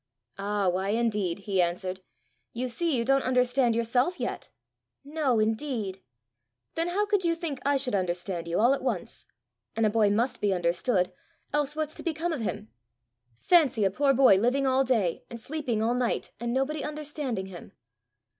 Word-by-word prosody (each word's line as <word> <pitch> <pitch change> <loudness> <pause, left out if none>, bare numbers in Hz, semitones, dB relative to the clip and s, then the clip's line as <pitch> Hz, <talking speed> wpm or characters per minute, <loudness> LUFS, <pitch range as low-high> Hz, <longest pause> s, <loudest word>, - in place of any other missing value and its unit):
"Ah, 200 0 0
why 185 +2 0
indeed?" 210 -5 0
he 195 -3 +2
answered. 185 +2 -2 0.5
"You 250 +2 -2
see 320 +5 -1
you 230 - 0
don't 270 +1 +3
understand 250 -1 +2
yourself 245 +8 +1
yet!" - - -4 0.6
"No 290 -5 0
indeed!" 220 -3 -1 0.7
"Then 330 +1 -1
how 395 +4 +1
could 405 -2 +1
you 335 -1 +2
think 325 -5 -4
I 285 0 +2
should 260 -3 -1
understand 180 -2 -2
you 170 - 0
all 240 +5 +5
at 275 - -2
once? 230 -9 -3 0.5
and 225 0 +2
a 210 - +3
boy 215 -2 +3
must 230 +6 0
be 200 -2 +2
understood, 180 +3 0 0.4
else 295 0 0
what's 310 -1 -2
to - - -7
become 335 0 -2
of 285 - -3
him! 195 - -4 0.7
Fancy 285 - +4
a 195 - +2
poor 275 +7 +2
boy 260 -7 +6
living 250 +7 +1
all 265 0 +3
day, 220 -10 0
and 235 - -8
sleeping 250 -4 -2
all 230 +2 +2
night, 245 -1 -1
and 235 +1 -2
nobody 270 +4 -1
understanding 295 -8 -4
him!" 185 -2 -11
240 Hz, 175 wpm, -27 LUFS, 200-280 Hz, 0.7 s, boy